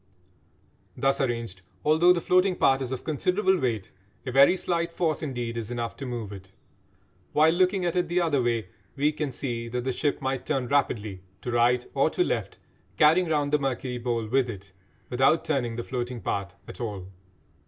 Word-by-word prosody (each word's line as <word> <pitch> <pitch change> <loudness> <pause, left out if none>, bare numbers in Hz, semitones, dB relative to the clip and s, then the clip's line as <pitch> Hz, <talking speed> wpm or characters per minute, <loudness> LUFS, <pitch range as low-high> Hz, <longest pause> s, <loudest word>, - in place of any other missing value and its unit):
Thus 135 +1 +1
arranged, 115 -7 -2 0.2
although 160 +4 +5
the 175 -1 +2
floating 185 +2 +3
part 135 -4 +3
is 130 -1 -3
of 130 -1 -4
considerable 180 +5 +1
weight, 115 -7 -2 0.3
a 130 - -3
very 140 +7 +6
slight 170 -2 -1
force 165 -3 -1
indeed 120 -5 -3
is 115 -1 -4
enough 120 -1 -3
to 135 - -6
move 115 -5 -5
it; 95 -1 -11 0.8
while, 155 +2 +5
looking 185 +1 +2
at 175 - -1
it 180 -1 +1
the 175 +2 +1
other 160 -6 +2
way, 115 -2 -1 0.3
we 145 +2 +2
can 150 -2 -3
see 120 -2 -4
that 125 +1 -3
the 130 - -1
ship 145 +3 -1
might 135 -2 -2
turn 135 -5 -1
rapidly 110 -8 0 0.2
to 125 - -3
right 120 +1 +3
or - - +3
to - - +1
left, - - -2 0.4
carrying 165 +4 +5
round 145 -2 0
the 150 - +4
mercury 130 -2 -2
bowl 120 -2 -1
with 125 +3 +1
it, 100 -3 -9 0.4
without 135 +7 +3
turning 130 -7 -1
the 120 - -4
floating 125 -1 -4
part 100 -4 -3
at - - -9
all. 105 -6 -4
130 Hz, 185 wpm, -26 LUFS, 120-155 Hz, 0.8 s, very